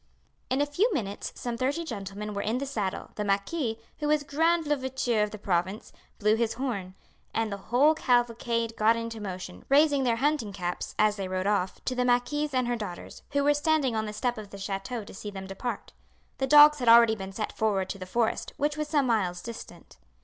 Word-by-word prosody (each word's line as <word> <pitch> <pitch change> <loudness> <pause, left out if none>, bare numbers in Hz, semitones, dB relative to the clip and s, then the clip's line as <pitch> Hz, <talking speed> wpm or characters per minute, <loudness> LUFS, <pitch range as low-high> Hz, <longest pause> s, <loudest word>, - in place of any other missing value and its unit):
In 260 +2 +1
a - - +3
few 360 +12 +1
minutes 205 -7 -3
some 240 -1 -4
thirty 280 +7 -1
gentlemen 210 -5 -6
were 200 - -2
in 220 +4 -1
the 275 - -2
saddle, 210 -9 -3
the 210 - -3
marquis, 220 +5 -1 0.2
who 300 - -1
was 300 -1 +2
grand 325 +3 +1
louvetier 260 -5 0
of 210 - +1
the 215 - -8
province, 190 +1 -2 0.2
blew 210 +1 +3
his 225 -1 0
horn, 205 -8 -4 0.4
and 225 -1 0
the 200 - -3
whole 280 +6 +5
cavalcade 235 -4 0
got 220 +2 +4
into 230 -1 -5
motion, 185 -2 -7
raising 285 0 +4
their 240 -2 +2
hunting 270 -4 0
caps, 180 -2 -4
as 215 0 +3
they 195 -1 -3
rode 185 0 -2
off, 200 -3 -1
to 255 - 0
the 250 0 0
marquise 250 +5 +1
and 255 -2 +1
her 240 - 0
daughters, 205 -6 -7
who 285 0 +2
were 290 +1 +4
standing 290 -4 +1
on 220 0 -1
the - - -4
step 240 +2 -1
of 210 -2 -9
the 200 - -9
chateau 200 +4 -4
to - - -12
see 205 +2 -7
them 190 -1 -7
depart. 200 +4 -5 0.5
The 265 - 0
dogs 295 +1 +8
had 245 -2 +2
already 230 -1 +7
been 195 -2 -7
sent 215 +2 -3
forward 200 -4 0
to 195 - -5
the 185 - -7
forest, 230 +3 -1
which 295 +1 0
was 305 -1 -2
some 295 -3 +2
miles 185 -7 0
distant. 235 -1 -10
230 Hz, 215 wpm, -28 LUFS, 200-275 Hz, 0.5 s, dogs